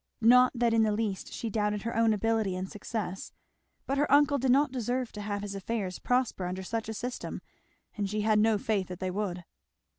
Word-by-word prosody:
Not 250 +2 +6
that 235 -1 +2
in 225 - +4
the 215 -1 +3
least 210 -2 -2
she 230 - -4
doubted 210 -1 0
her 230 - -3
own 225 0 +4
ability 220 -2 +1
and 185 +1 -3
success; 205 -2 -5 0.5
but 275 +1 -1
her 290 - +1
uncle 285 0 +5
did 260 +1 0
not 275 +2 +4
deserve 250 0 -2
to 210 - -7
have 205 0 -3
his 205 -1 -5
affairs 195 -1 -3
prosper 245 -7 0
under 185 +1 -4
such 225 +3 -3
a - - -3
system 245 +3 -5 0.6
and 205 -2 -2
she 210 +1 -1
had 215 0 +3
no 220 0 +4
faith 200 -2 -1
that 180 -1 -7
they 185 -1 -2
would. 180 -3 -3
220 Hz, 210 wpm, -29 LUFS, 200-235 Hz, 0.6 s, Not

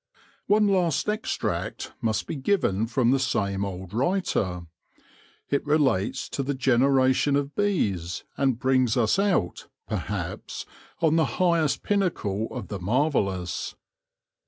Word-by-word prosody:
' - - -31
One 210 0 +4
last 180 -5 +1
extract 215 +1 -2
must 110 -1 0
be - - -4
given 130 - +1
from 120 0 +2
the 135 - +3
same 100 -6 0
old 95 -1 -6
writer. 115 - 0 0.9
It 140 - +1
relates 145 -10 +1
to - - -2
the 140 +1 -2
generation 130 +2 +3
of 145 0 -1
bees, 100 - 0
and 135 -4 +1
brings 130 -2 +2
us 120 - +2
out, 180 - 0 0.2
perhaps, - - -4 0.4
on 160 -1 +3
the 160 - +4
highest 170 -5 +2
pinnacle 140 - 0
of 120 -6 -7
the 100 - -4
marvellous. 100 - 0
130 Hz, 130 wpm, -26 LUFS, 100-160 Hz, 0.9 s, One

